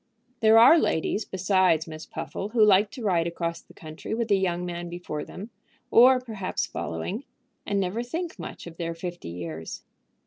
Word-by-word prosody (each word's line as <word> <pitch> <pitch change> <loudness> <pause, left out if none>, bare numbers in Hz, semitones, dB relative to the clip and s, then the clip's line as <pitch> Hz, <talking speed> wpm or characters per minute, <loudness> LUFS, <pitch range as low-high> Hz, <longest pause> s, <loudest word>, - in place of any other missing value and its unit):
There 220 -1 +6
are 260 +9 +8
ladies 200 - 0
besides 185 -4 +2
Miss 155 -1 -9
Puffle 200 - -5
who 220 -1 +4
like 205 0 +5
to 250 -1 -9
ride 175 -5 +2
across 170 0 -3
the - - -20
country 155 +6 -6
with 230 -1 -2
a - - +7
young 180 -2 0
man 175 0 -5
before 170 -3 -5
them, 210 +5 -9 0.4
or 255 +2 +7
perhaps 220 -7 -3
following, 130 - -4 0.4
and 200 - +1
never 195 +4 -1
think 325 +8 -5
much - - -8
of 170 -1 -10
their 170 -1 -3
fifty 175 - -6
years. 85 -2 -7
185 Hz, 175 wpm, -26 LUFS, 170-220 Hz, 0.4 s, are